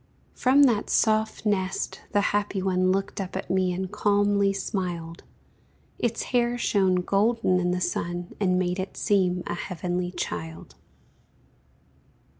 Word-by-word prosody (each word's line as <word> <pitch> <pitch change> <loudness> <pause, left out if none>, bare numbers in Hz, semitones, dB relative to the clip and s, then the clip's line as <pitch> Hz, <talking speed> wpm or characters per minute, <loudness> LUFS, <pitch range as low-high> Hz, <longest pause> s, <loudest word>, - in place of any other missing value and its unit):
From 270 +3 +4
that 235 -6 +2
soft 220 0 +1
nest 195 -2 -1
the 205 - +3
happy 205 -1 0
one 185 -1 +1
Looked 195 +1 -1
up 190 -1 -6
at 190 - -4
me 185 -1 +2
and 185 +1 -4
calmly 205 -1 +2
smiled; 175 -4 -4 0.8
Its 235 -1 -1
hair 240 0 +2
shone 195 -5 +2
golden 200 0 +2
in 180 0 0
the 180 0 0
sun, 175 0 -3
And 185 -3 +2
made 180 0 0
it 190 - -5
seem 185 -4 +1
a - - -3
heavenly 175 0 -3
child. 80 - -6
190 Hz, 135 wpm, -26 LUFS, 180-205 Hz, 0.8 s, From